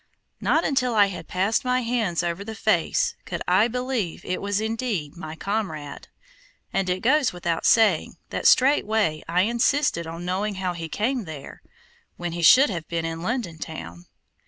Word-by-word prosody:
Not 325 - +2
until 250 -4 +1
I 205 -1 +6
had - - -8
passed 195 +7 0
my 255 0 +1
hands 225 -8 0
over 170 +3 -2
the 220 +1 -7
face - - +1
could - - -5
I 225 - +4
believe 250 -6 -3
it 185 - -2
was 200 0 -1
indeed 220 - -2
my 160 -2 -7
comrade, 160 -8 -4 0.7
and 190 -1 0
it 180 +1 -1
goes 270 +1 +3
without 170 -2 -1
saying 215 -8 +3
that - - +1
straightway 220 - +3
I 175 +2 +3
insisted 235 - +1
on 165 +2 -7
knowing 195 +3 -1
how 185 -1 -2
he 165 -2 -6
came 235 - -1
there, 155 -4 -9 0.6
when 175 -1 -4
he 170 +1 -4
should 255 - +7
have 170 -4 -5
been 165 -1 -2
in 165 0 -4
London 185 -5 -3
town. 85 - -8
195 Hz, 170 wpm, -24 LUFS, 170-235 Hz, 0.7 s, should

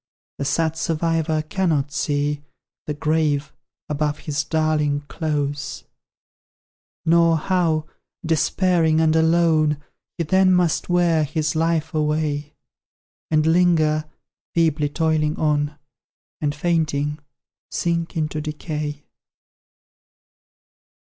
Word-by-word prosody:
The 140 - -2
sad 160 +2 0
survivor 160 -1 0
cannot 155 -4 0
see 145 0 -1 0.5
The 150 - -2
grave 150 -1 0 0.3
above 150 0 -1
his 150 0 -2
darling 150 -2 +1
close; 145 -1 -3 1.2
Nor 165 0 +4
how, 160 -2 +1 0.4
despairing 165 0 +2
and 160 0 +3
alone, 160 -2 +3 0.4
He 170 - 0
then 190 +3 +4
must 180 -2 +1
wear 175 -3 +3
his 155 +1 -1
life 165 0 0
away; 150 -1 -1 0.7
And 155 -1 +2
linger, 160 -2 +3 0.5
feebly 155 -3 +2
toiling 155 0 0
on, 150 -1 0 0.6
And 145 -1 0
fainting, 155 -2 0 0.5
sink 170 0 -2
into 155 -1 -1
decay. 150 -1 -4
155 Hz, 95 wpm, -22 LUFS, 150-165 Hz, 1.2 s, Nor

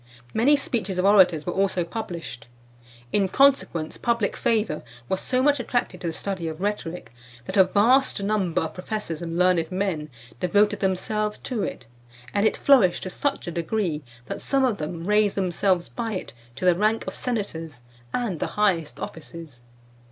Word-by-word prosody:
Many 255 +7 +4
speeches 210 -9 -2
of 180 - +1
orators 185 -6 +5
were 175 - -2
also 190 -2 +1
published. 170 - -6 0.7
In 195 -2 +2
consequence, 260 - +2
public 235 -4 0
favour 210 -9 0 0.3
was 190 - -1
so 255 0 0
much 290 -1 +3
attracted 245 -7 -2
to 175 - -3
the - - 0
study 185 -1 -4
of 160 0 -5
rhetoric, 180 - -3 0.3
that - - -5
a 190 -2 +7
vast 215 +4 +3
number 200 -6 +1
of 160 - -5
professors 180 -3 -4
and 165 0 -4
learned 180 -2 +3
men 185 -5 -2 0.3
devoted 205 +3 +2
themselves 210 +3 -1
to 245 -5 -3
it; - - -4 0.5
and 205 +1 +3
it - - -1
flourished 240 -11 +4
to 185 - -4
such 280 +6 -2
a 175 - -4
degree, 170 -1 -1 0.2
that - - -5
some 270 -1 +2
of 230 -6 0
them 165 +2 -5
raised 210 0 +3
themselves 185 -1 +1
by 230 -2 -4
it 185 - -5 0.2
to 140 - -4
the 180 - +6
rank 215 +5 +1
of - - -5
senators 165 - -4 0.3
and 220 -10 -2
the - - -1
highest 180 -8 +1
offices. 160 -5 -9
190 Hz, 170 wpm, -25 LUFS, 170-215 Hz, 0.7 s, a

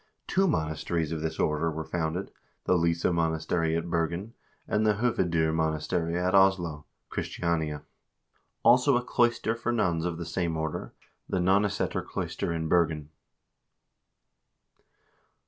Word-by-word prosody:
Two 195 +1 +2
monasteries 80 - -1
of 80 -1 -3
this 80 0 -3
order 75 +2 +1
were 80 0 -4
founded: 85 +3 -2 0.3
the 90 - +2
Lyse 85 -1 +1
monastery 80 -1 +1
at 85 +1 -3
Bergen, 85 +6 -2 0.3
and 105 - +1
the 105 -1 +3
Hoved0 85 -8 +1
monastery 80 +1 0
at 90 +1 0
Oslo 90 -6 +3 0.2
(Christiania); 80 -4 -2 0.8
also 125 +2 +5
a 125 - -2
cloister 120 -2 +1
for 115 +1 -2
nuns 90 -8 +1
of 85 -1 -2
the 85 - -5
same 85 -1 -1
order, 80 -1 -4 0.3
the - - 0
Nonneseter 100 +3 +1
cloister - - -3
in 80 -1 -2
Bergen. 80 -3 +1
85 Hz, 130 wpm, -28 LUFS, 80-95 Hz, 0.8 s, also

